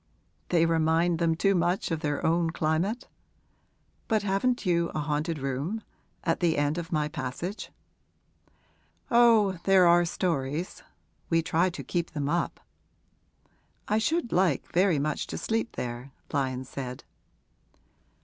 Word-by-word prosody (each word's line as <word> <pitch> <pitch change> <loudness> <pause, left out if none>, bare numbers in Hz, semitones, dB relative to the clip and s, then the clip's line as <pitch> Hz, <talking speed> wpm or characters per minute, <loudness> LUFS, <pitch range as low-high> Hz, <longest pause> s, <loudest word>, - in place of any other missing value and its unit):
'They 165 -2 +4
remind 165 +1 +2
them 165 -1 +2
too 195 +4 +2
much 175 0 0
of 165 - 0
their 145 +1 -2
own 165 +1 +2
climate? 165 +10 -1 1.0
But 220 -3 +1
haven't 210 +5 0
you 170 -2 +2
a - - 0
haunted 150 +2 -1
room 140 +11 -3 0.4
at 165 - 0
the 165 -3 +2
end 145 +3 +1
of 165 -1 -7
my 150 -2 +1
passage?' 150 +7 -5 1.4
'Oh, 225 -6 +5
there 190 -2 +6
are 175 0 +6
stories 165 -2 -2 0.5
we 165 -1 +2
try 175 +2 +2
to 180 - -7
keep 170 -2 -3
them 145 -3 -2
up.' 170 +3 -1 1.3
'I 215 - +3
should 315 +2 0
like 175 -5 +1
very 180 -2 +3
much 150 +2 -1
to - - -5
sleep 225 +1 -2
there,' 120 +2 -5 0.2
Lyon 130 -2 -1
said. 130 -1 -6
170 Hz, 135 wpm, -28 LUFS, 150-185 Hz, 1.4 s, there